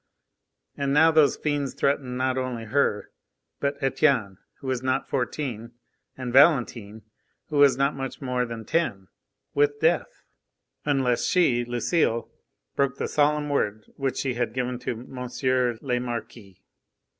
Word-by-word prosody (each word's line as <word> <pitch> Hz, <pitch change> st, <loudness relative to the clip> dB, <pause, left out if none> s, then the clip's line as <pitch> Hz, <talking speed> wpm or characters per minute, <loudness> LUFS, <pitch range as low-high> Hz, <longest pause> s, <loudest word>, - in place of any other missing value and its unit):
And 140 Hz, 0 st, -1 dB
now 160 Hz, +2 st, +6 dB
those 155 Hz, -2 st, +4 dB
fiends 145 Hz, -3 st, -2 dB
threatened 135 Hz, -3 st, 0 dB
not 130 Hz, 0 st, 0 dB
only 130 Hz, -3 st, -3 dB
her, 110 Hz, -3 st, 0 dB, 0.5 s
but 140 Hz, 0 st, -1 dB
Etienne 130 Hz, -9 st, +1 dB, 0.2 s
who -, -, -15 dB
was 130 Hz, -2 st, -1 dB
not 130 Hz, +1 st, -1 dB
fourteen, 120 Hz, -2 st, -3 dB, 0.4 s
and 125 Hz, -2 st, -5 dB
Valentine 120 Hz, -7 st, +3 dB, 0.5 s
who 150 Hz, -, -2 dB
was 140 Hz, -3 st, +6 dB
not 140 Hz, +1 st, +2 dB
much 135 Hz, -1 st, -5 dB
more 125 Hz, -2 st, -1 dB
than 115 Hz, -2 st, -6 dB
ten, 105 Hz, -, -1 dB, 0.4 s
with 145 Hz, 0 st, +2 dB
death, 165 Hz, +1 st, 0 dB, 0.6 s
unless 135 Hz, -4 st, +1 dB
she 130 Hz, -10 st, +3 dB
Lucile 120 Hz, 0 st, 0 dB, 0.4 s
broke 140 Hz, -2 st, +1 dB
the -, -, -2 dB
solemn 150 Hz, 0 st, +2 dB
word 110 Hz, -6 st, -1 dB
which 135 Hz, -2 st, -2 dB
she 130 Hz, -2 st, -1 dB
had 120 Hz, -1 st, -2 dB
given 125 Hz, -1 st, -2 dB
to -, -, -3 dB
M. 125 Hz, -1 st, -1 dB
le 125 Hz, -1 st, +1 dB
Marquis. 115 Hz, -5 st, -7 dB
130 Hz, 140 wpm, -25 LUFS, 120-140 Hz, 0.6 s, now